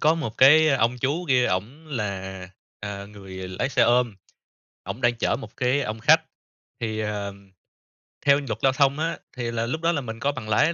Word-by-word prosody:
có 155 Hz, +2 st, +4 dB
một 155 Hz, -10 st, -5 dB
cái 155 Hz, +4 st, +7 dB
ông 125 Hz, -3 st, +2 dB
chú 145 Hz, +8 st, -1 dB
kia 125 Hz, -1 st, +4 dB
ổng 115 Hz, +13 st, -3 dB
là, 95 Hz, -8 st, -4 dB, 0.3 s
à, 100 Hz, -1 st, -5 dB
người 95 Hz, -2 st, -9 dB
lái 95 Hz, +8 st, -2 dB
xe 130 Hz, -3 st, +2 dB
ôm, 120 Hz, -1 st, +3 dB, 0.7 s
ổng 120 Hz, -, -6 dB
đang 120 Hz, -1 st, +3 dB
chở 115 Hz, -, 0 dB
một 115 Hz, -4 st, -11 dB
cái 130 Hz, +3 st, +2 dB
ông 110 Hz, -2 st, -4 dB
khách -, -, +5 dB, 0.6 s
thì, 110 Hz, -2 st, -2 dB
ờ, 105 Hz, -2 st, -3 dB, 0.9 s
theo 140 Hz, 0 st, +5 dB
luật 110 Hz, -1 st, -3 dB
giao 135 Hz, -, +5 dB
thông 140 Hz, +2 st, +2 dB
á, 165 Hz, +1 st, -1 dB, 0.2 s
thì 120 Hz, -2 st, -2 dB
là 115 Hz, 0 st, -1 dB
lúc 155 Hz, +7 st, -3 dB
đó 165 Hz, -, +2 dB
là 155 Hz, -4 st, -1 dB
mình 110 Hz, -3 st, -7 dB
có 140 Hz, +4 st, +1 dB
bằng 130 Hz, -6 st, -7 dB
lái 150 Hz, +10 st, +3 dB
120 Hz, 200 wpm, -24 LUFS, 105-140 Hz, 0.9 s, cái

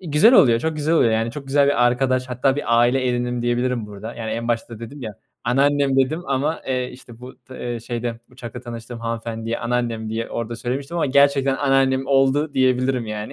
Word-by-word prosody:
iii, 175 Hz, -5 st, -8 dB
güzel 200 Hz, -, +6 dB
oluyor, 120 Hz, -, +6 dB
çok 160 Hz, -1 st, -2 dB
güzel 155 Hz, +2 st, +1 dB
oluyor. 115 Hz, -8 st, +4 dB
Yani 115 Hz, +1 st, 0 dB
çok 140 Hz, +2 st, -8 dB
güzel 140 Hz, +1 st, +3 dB
bir 130 Hz, -3 st, +3 dB
arkadaş. 130 Hz, +1 st, +1 dB
Hatta 130 Hz, +2 st, +1 dB
bir 115 Hz, -5 st, +1 dB
aile 125 Hz, +2 st, +3 dB
edindim 120 Hz, 0 st, -1 dB
diyebilirim 120 Hz, -1 st, 0 dB
burada. 105 Hz, +3 st, -8 dB
Yani 110 Hz, -2 st, -5 dB
en 115 Hz, +2 st, -3 dB
başta 115 Hz, -1 st, -2 dB
dedim 130 Hz, +4 st, -9 dB
ya, 110 Hz, -3 st, -6 dB, 0.3 s
"anneannem" 140 Hz, +2 st, +2 dB
dedim 140 Hz, +6 st, +1 dB
ama, 140 Hz, +4 st, -1 dB
eee, 125 Hz, -1 st, -1 dB
işte, 120 Hz, -2 st, -14 dB
bu 125 Hz, +1 st, -10 dB
d 125 Hz, -2 st, -5 dB
eee, 120 Hz, -, -5 dB
şeyde 120 Hz, 0 st, -4 dB
uçakta 120 Hz, -3 st, -9 dB
tanıştığım 115 Hz, 0 st, -8 dB
hanımefendiye 115 Hz, 0 st, -4 dB
anneannem 115 Hz, -2 st, -2 dB
diye 115 Hz, +1 st, -3 dB
orada 115 Hz, 0 st, -4 dB
söylemiştim 135 Hz, +6 st, -4 dB
ama 165 Hz, -, +1 dB
gerçekten 140 Hz, 0 st, +3 dB
anneannem 135 Hz, -1 st, +2 dB
oldu 140 Hz, +2 st, +2 dB
diyebilirim 130 Hz, -2 st, +1 dB
yani. 105 Hz, 0 st, -5 dB
125 Hz, 200 wpm, -21 LUFS, 115-135 Hz, 0.3 s, güzel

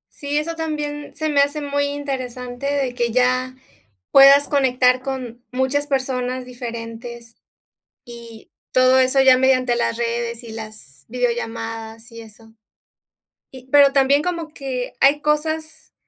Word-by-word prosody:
Sí, 290 Hz, 0 st, -3 dB
eso 325 Hz, +2 st, -2 dB
también 300 Hz, -2 st, -5 dB
se 310 Hz, +1 st, -2 dB
me 285 Hz, -2 st, +3 dB
hace 285 Hz, +2 st, 0 dB
muy 285 Hz, 0 st, -1 dB
interesante, 260 Hz, -3 st, -5 dB
de 275 Hz, -3 st, -1 dB
que 240 Hz, -1 st, -1 dB
ya 255 Hz, +1 st, +1 dB, 0.6 s
puedas 275 Hz, +1 st, +7 dB
conectar 255 Hz, -2 st, +2 dB
con 250 Hz, -3 st, -6 dB
muchas 260 Hz, +3 st, 0 dB
personas 255 Hz, -2 st, -2 dB
diferentes, 235 Hz, -1 st, -8 dB, 0.7 s
y 235 Hz, -2 st, -12 dB, 0.2 s
todo 255 Hz, 0 st, +4 dB
eso 260 Hz, +1 st, +3 dB
ya 265 Hz, -1 st, +7 dB
mediante 255 Hz, -2 st, +2 dB
las 235 Hz, -1 st, -1 dB
redes 235 Hz, 0 st, -3 dB
y 230 Hz, -, -9 dB
las 215 Hz, -12 st, -10 dB
videollamadas 225 Hz, -1 st, -4 dB
y 230 Hz, 0 st, -10 dB
eso. 225 Hz, 0 st, -16 dB, 1.0 s
Y 260 Hz, -1 st, -13 dB
pero 285 Hz, -1 st, +6 dB
también 275 Hz, +1 st, +3 dB
como 335 Hz, -2 st, -3 dB
que 255 Hz, -3 st, -5 dB
hay 280 Hz, +2 st, +4 dB
cosas, 315 Hz, +1 st, -2 dB
255 Hz, 135 wpm, -20 LUFS, 235-285 Hz, 1.0 s, puedas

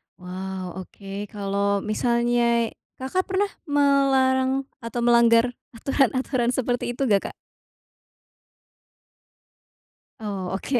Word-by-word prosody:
Wow, 185 Hz, 0 st, -6 dB
oke 195 Hz, +2 st, -7 dB
kalo 200 Hz, 0 st, -1 dB
misalnya 235 Hz, +1 st, +1 dB, 0.2 s
Kakak 265 Hz, +9 st, -2 dB
pernah 395 Hz, +2 st, 0 dB, 0.2 s
melarang 270 Hz, -2 st, +3 dB, 0.2 s
atau 235 Hz, 0 st, -4 dB
melanggar 235 Hz, 0 st, +5 dB, 0.2 s
aturan-aturan 255 Hz, -1 st, +1 dB
seperti 245 Hz, -1 st, -1 dB
itu 275 Hz, -, -1 dB
gak 200 Hz, -1 st, +3 dB
Kak? -, -, -8 dB, 2.9 s
Oh 195 Hz, -4 st, -4 dB
oke. 245 Hz, +6 st, 0 dB
235 Hz, 90 wpm, -24 LUFS, 200-260 Hz, 2.9 s, melanggar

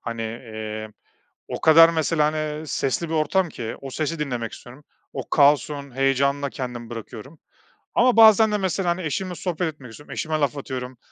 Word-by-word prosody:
hani, 115 Hz, -1 st, -5 dB
iii, 110 Hz, -1 st, -6 dB, 0.6 s
o -, -, -5 dB
kadar, 165 Hz, +1 st, +8 dB
mesela, 160 Hz, -1 st, +1 dB
hani, 155 Hz, +1 st, -1 dB
ııı, 155 Hz, 0 st, -4 dB
sesli 145 Hz, +4 st, -1 dB
bir -, -, -3 dB
ortam 165 Hz, +3 st, +1 dB
ki 115 Hz, -5 st, -6 dB
o 135 Hz, -, -7 dB
sesi 155 Hz, +4 st, -3 dB
dinlemek 125 Hz, -6 st, -3 dB
istiyorum. 125 Hz, +4 st, -13 dB, 0.3 s
O -, -, -6 dB
kaosun 140 Hz, -2 st, +2 dB
heyecanına 140 Hz, +1 st, +1 dB
kendimi 120 Hz, -3 st, -6 dB
bırakıyorum. 120 Hz, +5 st, -9 dB, 0.6 s
Ama 250 Hz, 0 st, +4 dB
bazen 220 Hz, -1 st, +7 dB
de, 210 Hz, -, +1 dB
mesela, 190 Hz, -1 st, -1 dB
hani, 175 Hz, +2 st, -2 dB
eşimle 180 Hz, +4 st, -3 dB
sohbet 170 Hz, -2 st, -3 dB
etmek 130 Hz, -5 st, -13 dB
istiyorum, 145 Hz, +6 st, -13 dB
eşime 155 Hz, 0 st, -2 dB
laf 145 Hz, 0 st, 0 dB
atıyorum, 130 Hz, -2 st, -6 dB
145 Hz, 175 wpm, -23 LUFS, 125-165 Hz, 0.6 s, kadar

